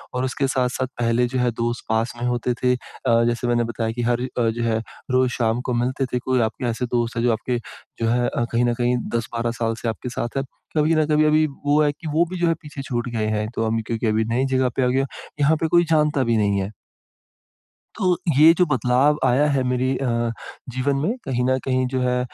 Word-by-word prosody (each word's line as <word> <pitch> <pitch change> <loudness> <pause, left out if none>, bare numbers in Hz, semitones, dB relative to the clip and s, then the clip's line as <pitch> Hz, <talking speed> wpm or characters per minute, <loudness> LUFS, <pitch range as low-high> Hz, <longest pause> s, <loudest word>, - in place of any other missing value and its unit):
और 125 - 0
उसके 135 +1 -1
साथ-साथ 130 -1 0
पहले 115 +1 +2
जो 130 +1 -2
है 125 -1 +2
दोस्त 120 +1 -3
पास 110 +2 0
में - - -1
होते 125 0 0
थे 125 0 +4
अ, 115 -1 0
जैसे 120 +1 -1
मैंने 120 0 +2
बताया 115 -1 -2
कि 120 +2 -4
हर 120 +1 +1
अ, 120 -2 0
जो 115 +1 -2
है 110 -1 +1 0.3
रोज़ 130 0 +3
शाम 115 0 0
को 125 - -3
मिलते 125 +3 0
थे, 125 0 -2
कोई 130 0 +1
आपके 115 +3 -2
ऐसे 120 +2 -2
दोस्त 120 -1 -1
है 115 - 0
जो 120 - +3
आपके 120 +3 -2 0.4
जो 115 - +2
है 120 +1 +2 0.2
कहीं 120 +1 +2
न 120 - +2
कहीं 120 +1 +1 0.2
10-12 115 0 -2
साल 115 0 +1
से 120 - -3
आपके 115 +3 -5
साथ 120 +1 -4
है, 135 - +1 0.3
कभी 155 +2 +3
न 155 -1 +3
कभी 155 0 +3
अभी 155 +1 +4 0.2
वो 145 +1 +4
है 145 - +3
कि 160 - -9
वो 165 +3 +3
भी 185 - -4
जो 175 - +2
है 165 - +3
पीछे 145 -3 -8
छूट 120 -2 -3
गए 110 -1 0
हैं। 110 0 -1
तो 115 - 0
अमी 115 0 0
क्योंकि 115 0 -1
अभी 110 +1 +1
नई 130 +2 +2
जगह 130 -1 +2
पे 130 - +2
आ - - +3
गया, 135 +2 +1 0.3
यहाँ 145 +2 +4
पे 160 - +2
कोई 175 +1 +4
जानता 150 -3 +3
भी 115 -2 +1
नहीं 100 -2 +2
है। 95 +2 -3 1.2
तो, 185 -3 +1 0.2
ये 160 +2 +9
जो 180 - +3
बदलाव 135 +1 +2
आया 135 +5 +3
है 135 -2 +1
मेरी 125 +1 0
अ, 120 -3 0 0.4
जीवन 135 +2 0
में 210 +9 0
कहीं 125 -2 -1
न 130 +1 +2
कहीं 130 -1 +1
जो 130 - +1
है, 125 0 +1
125 Hz, 240 wpm, -22 LUFS, 115-135 Hz, 1.2 s, ये